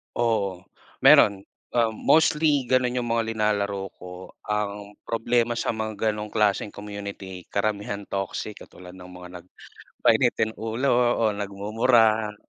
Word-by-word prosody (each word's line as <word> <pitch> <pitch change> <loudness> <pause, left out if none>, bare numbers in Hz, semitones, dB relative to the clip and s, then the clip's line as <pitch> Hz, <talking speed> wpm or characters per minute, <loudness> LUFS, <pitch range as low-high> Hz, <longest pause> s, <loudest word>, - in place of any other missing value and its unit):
Oo, 100 -6 0 0.4
meron. 100 -2 +6 0.3
Ah, 115 -2 +3
mostly 150 +2 +2
ganun 130 -1 +2
yung 120 - -4
mga 115 -1 0
nilalaro 100 -2 -1
ko. 90 +1 -10 0.2
Ang 105 -1 -3
problema 120 +1 0
sa - - -1
mga 110 -1 -4 0.2
ganung 105 0 -6
klaseng 105 0 +1
community 100 -3 -8
karamihan 100 0 -2
toxic. 100 +2 -4
Katulad 90 0 -13
ng 90 -1 -12
mga 90 0 -11
nag - - -29 0.6
mainitin 110 - +3
ulo 115 +5 -1 0.2
o 110 -2 +1
nagmumura. 110 +2 +1
105 Hz, 125 wpm, -24 LUFS, 100-115 Hz, 0.6 s, meron